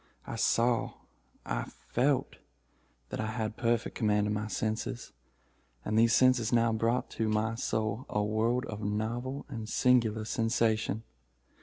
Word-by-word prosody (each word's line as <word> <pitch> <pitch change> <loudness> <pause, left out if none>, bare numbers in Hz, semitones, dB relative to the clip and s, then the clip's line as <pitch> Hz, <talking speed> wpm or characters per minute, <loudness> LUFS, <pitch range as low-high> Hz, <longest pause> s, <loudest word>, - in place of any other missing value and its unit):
I - - -5
saw—I 115 - -1 0.3
felt 135 +2 +1 0.7
that - - -5
I 110 - -2
had 110 -1 -3
perfect 115 -1 0
command 105 -1 +2
of 105 - 0
my 105 +1 -2
senses—and 70 - -5
these 115 +1 +5
senses 130 -3 +4
now 115 -1 +3
brought 115 +3 0
to 110 -1 -1
my 110 +1 +1
soul 110 0 -2
a 105 - 0
world 115 +5 +1
of 105 0 -6
novel 115 +6 -2
and 115 -5 -6
singular 115 -4 +3
sensation. 115 -1 0
110 Hz, 130 wpm, -30 LUFS, 105-120 Hz, 0.7 s, these